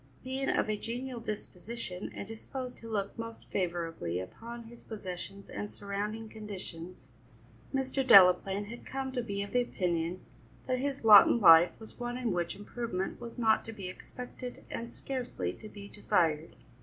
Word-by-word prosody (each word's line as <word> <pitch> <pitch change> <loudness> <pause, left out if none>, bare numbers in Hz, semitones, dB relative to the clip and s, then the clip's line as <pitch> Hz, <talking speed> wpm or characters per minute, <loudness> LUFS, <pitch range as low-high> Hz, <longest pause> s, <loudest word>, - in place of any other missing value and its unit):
Being 265 +2 -1
of - - +2
a 215 0 0
genial 245 +3 -4
disposition 210 -2 -6
and 200 - -5
disposed 250 +3 -6
to 230 - -9
look 200 -2 -2
most 230 0 -7
favourably 165 - -1
upon 235 - -7
his 230 +1 -13
possessions 195 -2 -7
and 205 - -5
surrounding 210 +2 -4
conditions, 185 -5 -8 0.6
Mr. 270 0 0
Delaplaine 195 -2 +7
had 235 +3 -9
come 265 0 -4
to 255 -1 -1
be 200 -3 -2
of 200 - -8
the 250 - +3
opinion 175 -5 -1 0.4
that 255 -1 0
his 275 -2 -2
lot 210 -3 +11
in - - +3
life 165 -3 +8
was 220 +2 -9
one 240 0 -3
in 245 -3 -1
which 175 -2 -1
improvement 205 -1 -4
was 235 -1 -8
not 220 -2 +4
to 225 - -6
be 200 -4 -6
expected 250 +5 -8
and 230 0 -4
scarcely 245 - -3
to 215 - -11
be 200 -1 -10
desired. 165 -7 +1
215 Hz, 165 wpm, -31 LUFS, 185-240 Hz, 0.6 s, lot